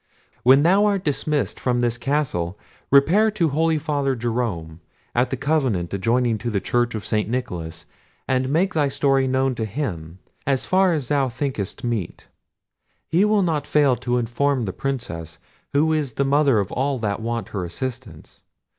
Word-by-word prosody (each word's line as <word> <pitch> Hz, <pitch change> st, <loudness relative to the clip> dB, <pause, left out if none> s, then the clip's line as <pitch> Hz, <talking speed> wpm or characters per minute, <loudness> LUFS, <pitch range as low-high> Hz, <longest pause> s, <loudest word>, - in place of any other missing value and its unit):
When 135 Hz, +3 st, +6 dB
thou 195 Hz, +5 st, +4 dB
art 200 Hz, -2 st, 0 dB
dismissed 150 Hz, 0 st, -1 dB
from 125 Hz, -1 st, 0 dB
this 120 Hz, -1 st, +1 dB
castle, 120 Hz, -, -1 dB, 0.3 s
repair 170 Hz, +11 st, +5 dB
to 190 Hz, -7 st, 0 dB
holy 160 Hz, +2 st, +1 dB
father 145 Hz, -3 st, -1 dB
Jerome, 110 Hz, -9 st, -3 dB, 0.3 s
at 125 Hz, +1 st, +2 dB
the 130 Hz, -, -2 dB
convent 130 Hz, -, 0 dB
adjoining 115 Hz, +3 st, +1 dB
to 120 Hz, -, -3 dB
the 105 Hz, -3 st, 0 dB
church 120 Hz, +3 st, 0 dB
of 105 Hz, -, -5 dB
St. 105 Hz, 0 st, 0 dB
Nicholas, 90 Hz, -10 st, -4 dB, 0.4 s
and 130 Hz, 0 st, +1 dB
make 180 Hz, +7 st, +1 dB
thy 150 Hz, -3 st, +2 dB
story 135 Hz, -1 st, +2 dB
known 130 Hz, 0 st, +1 dB
to 115 Hz, -, -3 dB
him, 95 Hz, -, -4 dB, 0.3 s
as 135 Hz, -2 st, +1 dB
far 185 Hz, -1 st, +3 dB
as 140 Hz, -6 st, -4 dB
thou 140 Hz, -3 st, +2 dB
thinkest 120 Hz, -5 st, -4 dB
meet. 115 Hz, -7 st, -3 dB, 0.8 s
He 175 Hz, +5 st, +3 dB
will 210 Hz, -1 st, +3 dB
not 160 Hz, -4 st, -1 dB
fail 145 Hz, -4 st, +3 dB
to 125 Hz, 0 st, -1 dB
inform 125 Hz, +2 st, 0 dB
the 95 Hz, -, -4 dB
Princess, 85 Hz, -, -4 dB, 0.3 s
who 155 Hz, +3 st, +2 dB
is 145 Hz, -6 st, -1 dB
the 140 Hz, -, 0 dB
mother 140 Hz, -3 st, +3 dB
of 100 Hz, -3 st, -1 dB
all 135 Hz, +1 st, 0 dB
that 105 Hz, -3 st, -2 dB
want 115 Hz, 0 st, -3 dB
her 100 Hz, -3 st, -3 dB
assistance. 120 Hz, -, -7 dB
130 Hz, 170 wpm, -22 LUFS, 115-145 Hz, 0.8 s, When